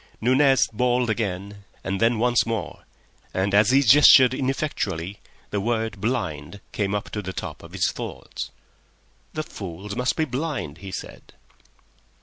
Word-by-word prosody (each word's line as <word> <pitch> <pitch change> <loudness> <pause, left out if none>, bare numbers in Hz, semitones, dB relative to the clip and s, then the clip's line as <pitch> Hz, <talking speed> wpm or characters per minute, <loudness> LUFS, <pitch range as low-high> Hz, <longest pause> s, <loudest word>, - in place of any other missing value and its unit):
Nunez 130 0 +4
bawled 125 +1 +1
again, 100 -2 -4 0.2
and 95 +1 -3
then 115 0 +3
once 120 +1 +3
more, 115 -1 -4 0.5
and 95 +1 0
as 105 +1 +5
he 135 +2 +5
gestured 130 0 +8
ineffectually 105 - -2 0.3
the 100 - -1
word 110 -3 -2
"blind" 95 - -3
came 100 -1 -1
up 105 - -4
to 105 - -3
the 95 -1 -6
top - - -6
of - - -13
his - - +1
thoughts. - - -6 0.8
"The 155 - -2
fools 100 - -7
must 125 +1 0
be 160 - +1
blind," 130 - -4
he 95 0 -8
said. 95 - -8
110 Hz, 145 wpm, -24 LUFS, 100-125 Hz, 0.8 s, gestured